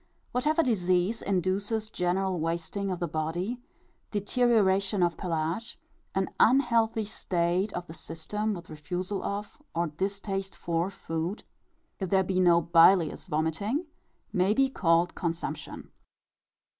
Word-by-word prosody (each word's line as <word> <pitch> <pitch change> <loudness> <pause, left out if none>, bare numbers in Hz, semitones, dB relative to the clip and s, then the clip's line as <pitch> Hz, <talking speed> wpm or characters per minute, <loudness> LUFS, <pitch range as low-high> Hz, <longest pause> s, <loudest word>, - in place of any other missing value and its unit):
Whatever 305 +6 +2
disease 185 - +1
induces 200 +4 -1
general 185 0 0
wasting 170 +5 -2
of 185 - -1
the 175 - -1
body, 175 +10 -2 0.5
deterioration 205 -3 +2
of 170 -1 +2
pelage, 170 +5 -2 0.4
an 190 0 +1
unhealthy 230 -3 +4
state 185 -1 0
of 175 0 -4
the 160 - -10
system, 210 +7 -3
with 170 -2 -10
refusal 180 +6 -4
of, 205 +7 -4
or 170 +1 +2
distaste 195 +4 -3
for, 170 +2 -1
food 165 +1 -4 0.6
if 190 -3 -2
there 190 0 +4
be 185 0 0
no 175 -2 +6
bilious 170 +1 +4
vomiting 180 - -1 0.5
may 190 +3 +3
be 270 +1 +3
called 170 -4 +2
consumption. 165 -3 -4
190 Hz, 120 wpm, -28 LUFS, 170-210 Hz, 0.6 s, no